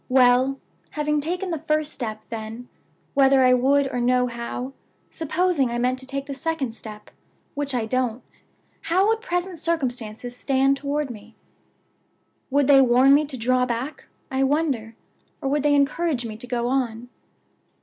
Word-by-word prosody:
Well, 255 +1 +4 0.3
having 300 0 0
taken 355 +5 -3
the 325 - -2
first 305 0 0
step, 220 -3 -5
then, 225 +2 -7 0.4
whether 270 -1 +5
I 255 - +6
would 275 +3 +3
or 245 - -1
no, 250 +1 +3
how 245 +2 -5 0.4
supposing 325 -4 0
I 235 - -2
meant 250 +2 0
to 260 - -9
take 275 0 -4
the 280 - -5
second 305 -3 -2
step, 215 -2 -10 0.4
which 285 -2 -2
I 235 -3 0
don't 250 0 -1 0.6
how 360 +4 +3
would 450 0 +1
present 355 -6 -3
circumstances 245 -7 -3
stand 270 +1 +2
toward 285 0 -2
me? 220 0 -12 1.1
Would 285 +1 +3
they 275 0 +7
warn 255 +2 +5
me 295 +2 +4
to 275 -3 -7
draw 250 +2 +1
back, 245 +5 -4 0.2
I 265 0 0
wonder? 270 -6 0 0.4
or 275 - -2
would 290 +1 +1
they 290 0 +3
encourage 280 -2 +1
me 220 -2 -6
to 235 +3 -10
go 240 -1 -1
on? 245 -3 -1
265 Hz, 160 wpm, -23 LUFS, 245-295 Hz, 1.1 s, they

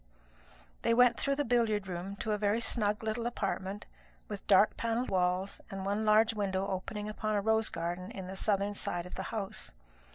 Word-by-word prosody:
They 230 - +3
went 245 0 +5
through 275 - +1
the 290 0 0
billiard 220 -4 +2
room 185 +2 -4
to 220 - -2
a 210 - +1
very 210 +2 +2
snug 210 -2 +1
little 220 +2 -1
apartment, 200 -3 -3 0.4
with 205 -2 -7
dark 205 +1 +6
panelled 230 +2 -1
walls 185 +1 0
and 195 -1 -5
one 205 +2 0
large 220 +1 +5
window 195 -2 -1
opening 200 +2 -4
upon 215 0 -2
a 205 - +2
rose 220 +1 +2
garden 175 +2 -4
on 190 - -5
the 190 +1 -6
southern 200 0 +1
side 175 -3 -3
of 180 - -10
the - - -4
house. 210 -4 -4
205 Hz, 190 wpm, -32 LUFS, 190-220 Hz, 0.4 s, dark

